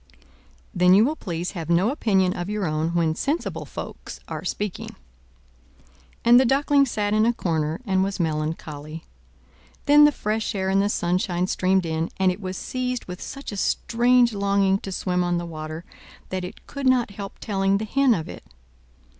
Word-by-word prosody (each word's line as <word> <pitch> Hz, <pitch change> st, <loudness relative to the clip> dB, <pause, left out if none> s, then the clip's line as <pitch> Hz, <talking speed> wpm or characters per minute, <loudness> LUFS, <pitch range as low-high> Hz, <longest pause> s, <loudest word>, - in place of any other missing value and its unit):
"Then 180 Hz, +1 st, +5 dB
you 210 Hz, +3 st, +6 dB
will 300 Hz, +4 st, 0 dB
please 175 Hz, -, -4 dB
have 165 Hz, -4 st, -6 dB
no 180 Hz, +7 st, +3 dB
opinion 195 Hz, -, +1 dB
of 175 Hz, +2 st, -4 dB
your 210 Hz, -2 st, -2 dB
own 155 Hz, +1 st, -1 dB
when 165 Hz, -2 st, +2 dB
sensible 290 Hz, -, -2 dB
folks -, -, -8 dB
are -, -, -5 dB
speaking. 205 Hz, -3 st, -4 dB, 1.3 s
And 240 Hz, +1 st, +8 dB
the -, -, +5 dB
Duckling 275 Hz, +2 st, +3 dB
sat 210 Hz, -3 st, -1 dB
in 215 Hz, 0 st, +3 dB
a 235 Hz, +2 st, +3 dB
corner 160 Hz, -6 st, -1 dB
and 190 Hz, -2 st, +2 dB
was 195 Hz, 0 st, -3 dB
melancholy; 155 Hz, -1 st, -3 dB, 0.8 s
then 295 Hz, 0 st, +7 dB
the 295 Hz, -, +5 dB
fresh 215 Hz, -3 st, -2 dB
air 190 Hz, -1 st, -1 dB
and 195 Hz, +1 st, +3 dB
the 200 Hz, -, +1 dB
sunshine 180 Hz, -1 st, 0 dB
streamed 185 Hz, 0 st, +1 dB
in; 160 Hz, +1 st, -2 dB
and 190 Hz, -1 st, +3 dB
it 185 Hz, +3 st, -7 dB
was 185 Hz, -1 st, -5 dB
seized 250 Hz, -1 st, -3 dB
with 180 Hz, 0 st, -8 dB
such 275 Hz, -2 st, -7 dB
a 205 Hz, -, -6 dB
strange 240 Hz, +3 st, +2 dB
longing 200 Hz, -1 st, +2 dB
to 195 Hz, -, -7 dB
swim 180 Hz, -1 st, -1 dB
on 175 Hz, 0 st, 0 dB
the 175 Hz, -, -3 dB
water, 155 Hz, 0 st, -7 dB, 0.4 s
that 185 Hz, -1 st, -3 dB
it 180 Hz, -, -9 dB
could 280 Hz, -1 st, -4 dB
not 250 Hz, -4 st, +3 dB
help 200 Hz, 0 st, -8 dB
telling 195 Hz, -2 st, 0 dB
the 215 Hz, -, -3 dB
Hen 270 Hz, +1 st, +3 dB
of 160 Hz, -, -4 dB
it. -, -, -9 dB
195 Hz, 180 wpm, -24 LUFS, 175-230 Hz, 1.3 s, And